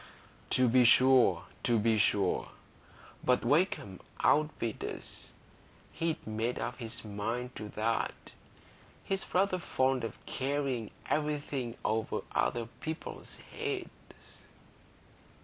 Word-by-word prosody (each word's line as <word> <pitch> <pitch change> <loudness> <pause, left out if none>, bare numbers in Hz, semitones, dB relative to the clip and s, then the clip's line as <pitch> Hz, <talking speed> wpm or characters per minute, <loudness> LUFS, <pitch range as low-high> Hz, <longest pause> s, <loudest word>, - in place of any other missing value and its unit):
"To 130 -1 +4
be 125 +2 +6
sure, 130 +1 +6 0.2
to 120 - +3
be 110 0 +3
sure. 100 -2 +2 0.7
But 125 -1 +3
Wakem 140 - +1 0.2
outbid 145 -7 +2
us; - - -6 0.6
he'd 165 -1 -2
made 110 +3 -1
up 120 +3 -3
his 115 -1 -5
mind 115 +5 -3
to 105 -1 -6
that. 115 +1 -1 0.7
He's 195 0 -2
rather 185 0 +2
fond 130 -6 +1
of 115 - -4
carrying 135 -4 -1 0.2
everything 145 -5 -1
over 110 0 0
other 120 -1 +1
people's 155 +7 -6 0.2
heads." 425 -5 -6
125 Hz, 105 wpm, -32 LUFS, 115-145 Hz, 0.7 s, be